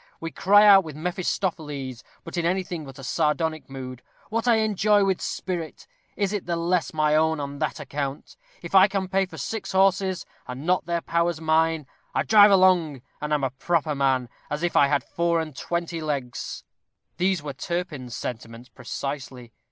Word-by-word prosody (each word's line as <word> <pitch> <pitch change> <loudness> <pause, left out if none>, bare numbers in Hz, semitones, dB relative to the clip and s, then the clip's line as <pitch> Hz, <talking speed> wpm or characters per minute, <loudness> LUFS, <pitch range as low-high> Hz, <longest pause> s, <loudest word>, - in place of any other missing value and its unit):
We 165 0 -5
cry 205 +2 +5
out 195 -2 +8
with 155 -4 -8
Mephistopheles, 155 -6 -3 0.2
but 165 - -8
in 170 - 0
anything 175 -2 -1
but 135 -1 -11
a 135 - -10
sardonic 155 +3 -1
mood, 130 -2 -7 0.3
"What 230 +2 -1
I 235 - +6
enjoy 210 -1 +3
with 190 -2 0
spirit, 170 -4 -4 0.3
is 200 -1 0
it 205 -4 -3
the 170 - 0
less 170 0 0
my 155 -1 +2
own 160 0 +2
on 140 0 -5
that - - -2
account? 140 0 -5 0.3
If - - -8
I 190 0 +8
can 195 -2 -2
pay 195 +1 +1
for - - -11
six 220 -4 -4
horses, 190 -1 +2 0.2
are 125 - -5
not 165 +5 0
their 170 -1 0
powers 170 -1 0
mine! 160 -1 +2 0.3
I - - +2
drive 210 -1 +7
along, 180 -8 +4 0.2
and 150 0 -3
am 150 -2 +1
a 130 - 0
proper 155 +3 0
man, 135 -3 +1 0.2
as 150 +3 -3
if 175 - 0
I 140 - +6
had 140 -2 +1
four 170 0 0
and 155 -3 -5
twenty 170 +2 -3
legs!" 140 -5 -4 0.5
These 180 -2 +1
were 145 -2 -5
Turpin's 150 -6 -4
sentiments 115 +1 -7
precisely. 130 -2 -6
165 Hz, 180 wpm, -25 LUFS, 140-185 Hz, 0.5 s, out